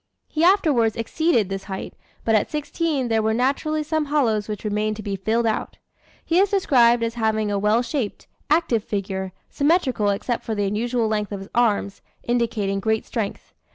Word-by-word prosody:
He 310 - -1
afterwards 305 - +4
exceeded 235 - +1
this 195 0 -4
height, 190 -1 -6 0.3
but 225 - +2
at 215 - +2
sixteen 300 -2 -1
there 225 -1 +2
were 220 0 +1
naturally 285 +5 0
some 310 0 -1
hollows 240 -8 +1
which 210 -2 -5
remained 215 0 -1
to 215 - -8
be 200 -1 -2
filled 220 +5 0
out. 220 -1 -2 0.5
He 340 +2 +2
is 395 +1 +4
described 245 - +4
as 230 0 -1
having 220 -2 0
a 200 - 0
well 210 +4 +2
shaped, 240 -4 -3 0.2
active 295 -8 +2
figure, 190 -3 -3 0.2
symmetrical 280 - +2
except 215 +4 -2
for 220 - -3
the 205 -1 0
unusual 230 +3 0
length 210 -1 -1
of 200 -1 -4
his 195 - -10
arms, 210 -4 +1 0.2
indicating 220 -5 0
great 220 +2 0
strength. 215 -4 -4
225 Hz, 180 wpm, -23 LUFS, 210-275 Hz, 0.5 s, afterwards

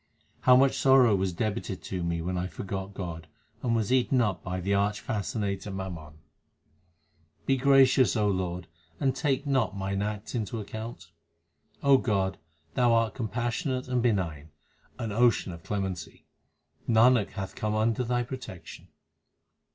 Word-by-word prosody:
How 125 - +6
much 135 +1 +4
sorrow 130 -5 +6
was 95 -1 0
debited 100 0 -3
to 90 -2 -4
me 85 -1 -2
when 90 +2 -2
I 90 +1 -1
forgot 95 +3 -6
God 85 -3 -6 0.3
and 115 -2 +1
was 110 +1 0
eaten 130 +1 +3
up 105 -6 0
by 90 0 -3
the 100 +3 -1
arch 100 +1 +1
fascinator 100 -1 -3
mammon 90 -6 -6 0.7
\ 80 -2 -40
Be 135 - +3
gracious, 135 -1 +5
O 105 -1 +2
Lord, 90 -2 -2 0.3
and 135 -1 +1
take 135 +1 0
not 130 -7 0
mine 100 0 -2
acts 105 0 -4
into 115 -2 -3
account. 110 -5 -7 0.7
O 140 -1 +6
God, 95 -5 0 0.3
Thou 120 -1 +3
art 115 -1 +2
compassionate 125 - -2
and 125 -1 0
benign, 85 -10 -1 0.5
an 110 - -4
ocean 115 -3 +2
of 85 -1 -9
clemency; 95 -3 -4 0.6
Nanak 115 -1 +4
hath 95 -1 -5
come 105 0 -2
under 110 +3 +1
Thy 120 0 0
protection. 120 - -9
105 Hz, 150 wpm, -28 LUFS, 95-125 Hz, 0.7 s, How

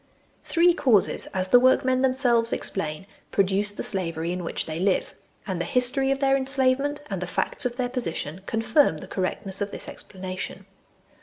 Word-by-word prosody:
Three 345 +1 +4
causes, 245 - +2
as 185 0 -2
the 245 - +7
workmen 255 0 +3
themselves 250 -3 +2
ex - - -2
plain, 155 -2 -4 0.2
produce 200 +1 +1
the 205 - -6
slavery 170 -4 -3
in 180 0 -3
which 165 - -3
they 160 +1 -5
live; 190 +1 +1 0.3
and 185 -4 -3
the - - -1
history 270 +1 +1
of 275 - +2
their 270 0 +3
enslavement 270 +2 +1
and 190 -2 -3
the 180 - -3
facts 180 - -1
of 240 - -8
their 250 -2 0
position 190 - -2
confirm 225 - +2
the 185 - -9
correctness 190 +1 -3
of 205 - -1
this - - -7
explanation. 185 0 -7
210 Hz, 175 wpm, -25 LUFS, 185-260 Hz, 0.3 s, the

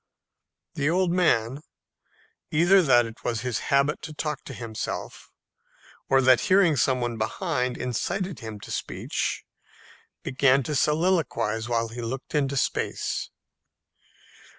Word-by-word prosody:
The 145 +1 0
old 180 +1 +2
man, 140 -7 +2 0.9
either 175 +5 +5
that 120 -7 +4
it 115 0 -10
was 115 -2 -1
his 125 -2 -2
habit 140 +2 +2
to 155 - -7
talk 150 -2 -3
to 135 - -7
himself, 115 -3 -6 0.8
or 135 0 +4
that 130 -3 +5
hearing 185 - +4
some 130 -1 +1
one 120 -2 -2
behind 125 - -1
incited 170 - -3
him 110 -2 -7
to - - -9
speech, - - -3 0.8
began 135 +1 +3
to 150 - -3
soliloquize 145 - +1
while 115 -1 0
he 120 +2 -7
looked 125 +3 -5
into 140 -2 0
space. - - -1
135 Hz, 130 wpm, -26 LUFS, 120-155 Hz, 0.9 s, either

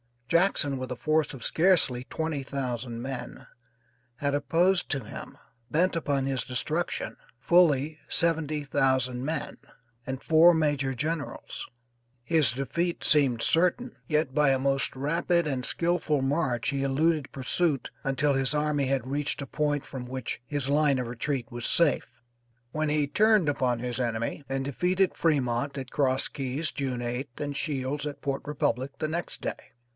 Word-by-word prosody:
Jackson, 155 -4 +2
with 130 0 -5
a - - -2
force 155 +2 +1
of 130 -4 -8
scarcely 160 -8 +3
twenty 160 -2 -3
thousand 125 -3 -4
men, 125 -1 -6 0.7
had 140 +2 -1
opposed 165 +6 +2
to 135 -4 -1
him, - - -9 0.3
bent 175 +6 +2
upon 140 -4 0
his 135 -1 -1
destruction, 160 - -2 0.2
fully 155 -3 +3
seventy 155 -3 +1
thousand 130 -2 +1
men, 160 +2 -3 0.5
and 130 0 -4
four 165 +2 +6
major 145 -4 +1
generals; 155 +2 -4 0.6
his 145 -3 +2
defeat 145 +7 -2
seemed 135 -6 +3
certain, 180 - +2
yet 150 -4 +1
by 150 -1 +4
a 135 - +3
most 135 +1 +1
rapid 165 +5 +1
and 130 -4 -2
skillful 165 -4 0
march 135 -4 0
he 140 -1 -1
eluded 145 +2 +1
pursuit 140 +2 0
until 135 +2 +2
his 135 +1 +1
army 150 -1 +1
had 130 -2 0
reached 145 +2 -1
a - - -3
point 145 +1 -1
from 130 -2 -7
which 130 -2 -4
his 145 -2 -1
line 145 -1 +3
of 125 -2 -2
retreat 125 +2 -3
was 120 -1 -5
safe, 170 -4 +3 0.6
when 155 +2 -1
he 150 0 +2
turned 210 +2 +3
upon 125 -4 0
his 120 0 -3
enemy 115 +3 -2
and 135 0 -2
defeated 180 +7 +1
Fremont 140 -3 0
at 130 -2 -6
Cross 130 -2 +1
Keys 140 +3 -3
June 130 -4 -3
8th, 120 +1 -4
and 145 -1 -3
Shields 145 -1 -2
at 145 - -7
Port 140 -1 -2
Republic 135 -2 -1
the 155 - -2
next 170 +2 -4
day. - - -6
140 Hz, 155 wpm, -28 LUFS, 130-155 Hz, 0.7 s, four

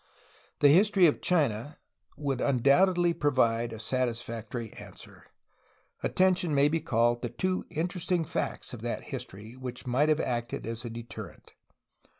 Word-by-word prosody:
The 145 - +7
history 190 +4 +5
of 155 - +2
China 145 -5 0 0.4
would 140 -3 -2
undoubtedly 170 +7 +3
provide 120 -6 +1
a 110 - -6
satisfactory 115 -1 -3
answer. - - -12 0.7
Atten 185 0 +3
tion 175 -4 -1
may 140 +1 +5
be 165 +2 0
called 120 -2 +1
to 120 - -3
two 185 +10 -2
interesting 175 +1 -1
facts - - -3
of - - -7
that - - -3
history 105 +5 -7
which 130 +1 -7
might 130 +5 +2
have 155 0 +3
acted 120 -4 -2
as 115 +1 -4
a 120 - -5
deterrent. 115 +1 -9
130 Hz, 145 wpm, -29 LUFS, 120-165 Hz, 0.7 s, The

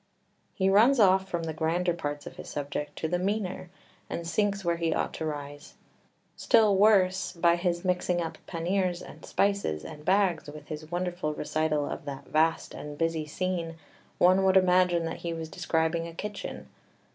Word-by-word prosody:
3 190 - +1
He - - +5
runs 235 +7 +5
off 190 -2 +4
from 170 -2 -2
the 160 -1 -3
grander 170 +3 0
parts 145 -3 -4
of - - -9
his - - -8
subject 145 0 -4
to 160 - -2
the 175 +2 0
meaner, 190 -2 -2 0.4
and 170 - -4
sinks 200 +2 0
where 170 0 +1
he 165 -1 0
ought - - -1
to 160 - -3
rise. 145 -1 -7 0.6
Still 215 -3 +4
worse, 190 -2 +4
by 170 -1 +3
his 175 0 -1
mixing 180 -1 +1
up 165 -1 -4
panniers 180 +1 -1
and - - -12
spices 200 - 0
and 150 -1 -9
bags 185 -4 +2
with 150 0 -11
his 155 0 -7
wonderful 175 -3 -2
recital 155 -1 0
of - - -6
that 140 -1 -6
vast 160 +1 +1
and 150 0 -8
busy 165 -1 -1
scene 170 0 -2 0.4
one 185 +2 +5
would 190 0 +5
imagine 180 -2 +3
that 165 - -4
he 170 -1 -4
was 160 -1 -6
describing 165 -1 0
a 165 - -10
kitchen. 210 +2 -6
170 Hz, 180 wpm, -28 LUFS, 160-185 Hz, 0.6 s, He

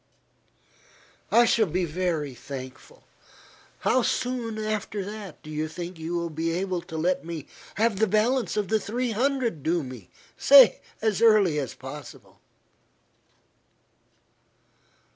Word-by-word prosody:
"I 240 +1 +6
shall 225 -2 +3
be 180 +2 -1
very 160 -4 -2
thankful. 130 - -10 0.8
How 255 - +3
soon 245 -2 -2
after 210 -2 -4
do 155 - -9
you 155 +1 -2
think 170 +2 -7
you 165 +2 -4
will 170 -1 -2
be 160 +2 -2
able 185 0 -2
to 165 -1 -8
let 180 +3 0
me 165 -3 -6 0.3
have 220 -2 +1
the 220 - +3
balance 220 +4 +1
of 205 -3 -1
the 220 0 +2
three 240 +4 -2
hundred 245 - 0
due 165 +2 0
me. 125 -8 -10 0.3
Say 270 -4 +7 0.2
as 220 -2 +1
early 210 -9 +5
as 135 -4 -4
possible." - - -11
190 Hz, 125 wpm, -26 LUFS, 160-225 Hz, 0.8 s, Say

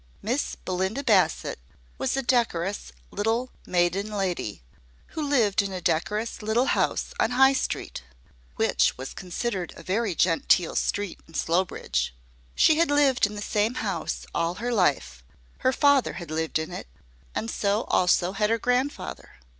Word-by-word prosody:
Miss 250 +7 -1
Belinda 190 +8 -2
Bassett 205 - +2 0.4
was 265 0 0
a 270 - 0
decorous 205 -7 0 0.2
little 225 +5 -1 0.2
maiden 180 +3 +1
lady, 180 - -3 0.5
who 315 - -5
lived 245 -10 +2
in 200 -1 -4
a 185 - -4
decorous 210 +8 -1
little 220 +4 +1
house - - 0
on - - +3
High 265 +2 +5
Street 265 - -3 0.5
(which - - +2
was 130 +1 -6
considered 185 0 -4
a 165 - -11
very 200 +1 -1
genteel 170 +1 +2
street 205 -3 -1
in 160 - -16
Slowbridge). 165 - 0 0.4
She 310 - +5
had 335 - +3
lived 280 -6 +4
in 210 - -9
the 205 - -5
same 215 +4 0
house - - -3
all 170 +1 0
her 240 +5 -2
life, 100 - +1 0.4
her 260 - +2
father 285 -1 +3
had 170 -4 -8
lived 160 0 -1
in 160 0 -4
it, - - -7 0.5
and 225 - -2
so 205 +2 0
also 180 0 +2
had 210 +2 0
her 230 - +2
grandfather. 250 +5 -2
205 Hz, 155 wpm, -26 LUFS, 175-245 Hz, 0.5 s, High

